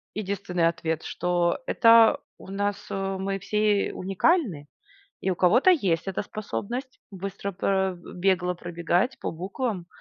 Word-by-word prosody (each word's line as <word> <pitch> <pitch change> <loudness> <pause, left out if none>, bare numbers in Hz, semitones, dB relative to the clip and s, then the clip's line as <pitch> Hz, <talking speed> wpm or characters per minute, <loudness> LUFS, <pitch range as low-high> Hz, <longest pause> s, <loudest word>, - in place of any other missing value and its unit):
единственный 190 -4 -1
ответ, 160 -1 -2
что 175 -1 0
это 230 -1 +6 0.2
у - - -13
нас, 200 +1 -1
э, 195 0 -2
мы 195 +1 -2
все 210 +1 +1
уникальны, 195 - 0 0.5
и - - -2
у - - -1
кого-то 230 - +5
есть 190 - +1
эта 190 - -2
способность 235 +5 -5
быстро 195 +1 -5
про 190 0 0
э, - - -11 0.2
бегло 180 -1 +1
пробегать 175 +6 -1
по - - -3
буквам. 185 +2 -4
195 Hz, 140 wpm, -26 LUFS, 180-210 Hz, 0.5 s, это